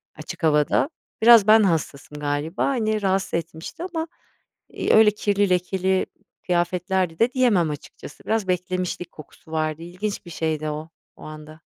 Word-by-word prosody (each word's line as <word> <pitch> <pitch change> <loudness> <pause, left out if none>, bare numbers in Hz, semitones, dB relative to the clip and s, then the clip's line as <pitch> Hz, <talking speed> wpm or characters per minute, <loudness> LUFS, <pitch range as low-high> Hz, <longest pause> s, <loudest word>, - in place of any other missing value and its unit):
açık - - -9
havada. 150 - +2 0.3
Biraz 230 -2 +7
ben 220 0 +7
hassasım 150 -5 -2
galiba, 145 +5 -2
hani, 220 -5 0
rahatsız 195 -1 0
etmişti 165 - -5
ama, 335 -3 -4 0.6
iii, - - -1
öyle 220 -1 +7
kirli 205 -1 0
lekeli 185 +1 +1 0.4
kıyafetlerdi 180 0 0
de 240 +3 +2
diyemem 220 - +3
açıkçası, 145 0 -9
biraz 220 -3 0
beklemişlik 180 -1 -2
kokusu 155 +1 -15
vardı, 155 0 -2
ilginç 185 +5 -5
bir 170 - -10
şeydi 155 -1 -2
o, 155 +2 -6 0.3
o - - -15
anda. 155 +1 -11
180 Hz, 145 wpm, -23 LUFS, 160-210 Hz, 0.6 s, Biraz